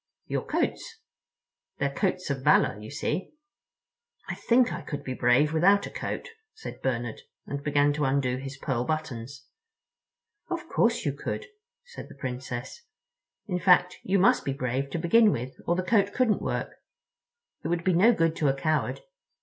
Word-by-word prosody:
"Your - - -2
coats. 460 -2 -2 0.8
They're 140 0 -1
coats 185 -2 -1
of 135 -1 -3
valor, 130 -1 +5
of 105 - -12
course." 140 +8 -8 1.3
"I - - -1
think 245 +1 +3
I - - -5
could 145 -2 -6
be 130 - -4
brave 130 +5 +3
without 195 +5 +4
a - - -8
coat," - - -4 0.3
said 445 - -9
Bernard, 120 -3 -2 0.2
and 140 0 -4
began 145 0 +3
to 150 0 0
undo 135 -2 +1
his 135 +1 -7
pearl 130 -3 -1
buttons. 140 -3 -4 1.0
"Of 345 -1 -4
course 235 -4 +1
you 140 - +1
could," 145 - -4 0.4
said 485 -1 -10
the - - -12
Princess. 125 - -5 0.6
"In 180 -4 -2
fact, 180 -1 +4
you 195 +1 +1
must 190 - +4
be 135 - -1
brave 135 +1 -2
to 155 - -3
begin 205 +6 +5
with, 125 -2 -3 0.2
or 175 - +3
the 185 - -1
coat 205 0 +2
couldn't 245 -5 +2
work. - - -3 0.9
It - - -2
would 170 0 -1
be 185 - +2
no 195 +8 +6
good 165 -6 +1
to 150 - +1
a 135 - +2
coward. 155 - -1
150 Hz, 170 wpm, -27 LUFS, 135-190 Hz, 1.3 s, no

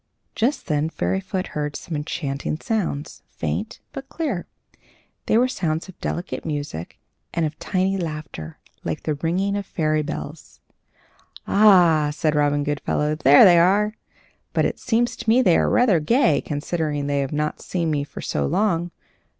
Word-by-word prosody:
Just 250 +6 0
then 150 -1 0
Fairyfoot 190 +2 -2
heard 150 -1 -3
some 165 - -6
enchanting 150 0 -3
sounds, 175 -10 -3
faint, - - -4
but 270 0 -8
clear. 275 - -3 0.8
They - - +4
were 250 +2 +4
sounds 165 -9 -2
of 190 - -13
delicate 175 - -4
music 145 - -5 0.4
and 170 -1 +1
of 155 0 -5
tiny 190 0 0
laughter, 155 - -6 0.3
like - - -4
the 155 - 0
ringing 180 +7 -1
of 200 -1 -4
fairy 155 -2 0
bells. 150 0 -7 0.9
"Ah!" 175 -7 +5
said 150 +1 0
Robin 145 -1 +2
Goodfellow, 150 +1 -1
"there 145 +1 +7
they 175 -3 +7
are! 205 +5 +3 0.6
But - - +2
it - - -2
seems 240 +1 +1
to - - -3
me 250 +3 +5
they 175 -7 +5
are - - +3
rather 225 -9 +4
gay, 160 - +3
considering 150 -1 -2
they 140 0 0
have 135 -1 -2
not 150 0 -2
seen 170 -3 -2
me 145 -2 0
for 145 - -9
so 70 -1 -1
long. 175 - +1
160 Hz, 160 wpm, -23 LUFS, 150-195 Hz, 0.9 s, there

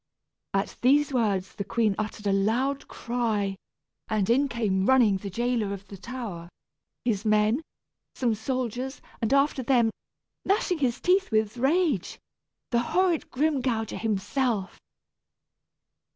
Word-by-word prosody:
At 195 - -1
these 285 +3 +4
words 200 -6 0
the 200 - -4
queen 215 +1 +1
uttered 215 0 -4
a 200 - +2
loud 240 +8 +1
cry, 220 -5 -1 0.5
and 215 -1 +1
in 275 +4 +3
came 205 -6 0
running 240 -7 +5
the 200 +1 -6
jailer 235 0 0
of 195 0 -9
the 200 - -8
tower, 200 -6 -7 0.6
his 215 -4 0
men, 215 +4 +3 0.5
some 240 -3 +1
soldiers, 255 +3 -3 0.2
and 225 - 0
after 275 0 +3
them, 240 -3 +3 0.5
gnashing 385 -4 +1
his 250 -3 0
teeth 375 +1 +2
with 215 -1 +1
rage, 275 - +1 0.5
the 235 - +3
horrid 350 +6 +1
Grimgouger 255 -6 0
himself. 220 0 -1
235 Hz, 125 wpm, -27 LUFS, 210-265 Hz, 0.6 s, running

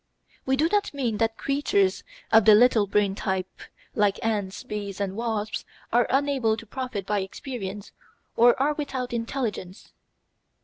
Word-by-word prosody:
We 265 - +3
do 310 +3 +3
not 405 -4 0
mean 240 -6 -1
that 225 0 0
creatures 375 +8 +1 0.3
of 225 -2 +6
the 215 -1 +9
little 225 -2 +5
brain 200 0 +2
type, 190 -2 -3 0.3
like 205 -2 +2
ants, 205 -2 -2
bees, 205 -2 -5
and 195 -1 -2
wasps, 220 -2 -2 0.3
are 240 0 +4
unable 270 -5 +1
to 225 - -9
profit 235 -4 -5
by 205 +1 0
experience 200 0 -6 0.4
or 240 +2 +5
are 290 +3 +2
without 260 -4 -4
intelligence. 230 -5 -4
225 Hz, 145 wpm, -25 LUFS, 205-265 Hz, 0.4 s, the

